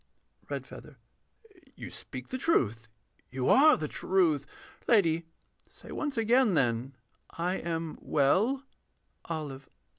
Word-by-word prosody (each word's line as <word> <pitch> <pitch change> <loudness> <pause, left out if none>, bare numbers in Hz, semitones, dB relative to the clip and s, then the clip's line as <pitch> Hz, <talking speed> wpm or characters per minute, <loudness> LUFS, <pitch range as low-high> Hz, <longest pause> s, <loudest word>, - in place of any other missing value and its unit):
REDFEATHER. - - -7 0.8
You - - -8
speak - - -9
the 260 - -4
truth 115 - +1 0.4
you 130 0 -2
are 305 +3 +7
the 155 - -3
Truth 160 -5 +1 0.4
Lady, 170 -7 +3 0.4
say - - -14
once 290 -4 -3
again 230 -2 +3
then, 125 0 0 0.4
'I 180 +3 0
am 165 -1 -4
well.' 210 - +2 0.7
OLIVE. 145 -5 -5
165 Hz, 110 wpm, -29 LUFS, 140-225 Hz, 0.8 s, are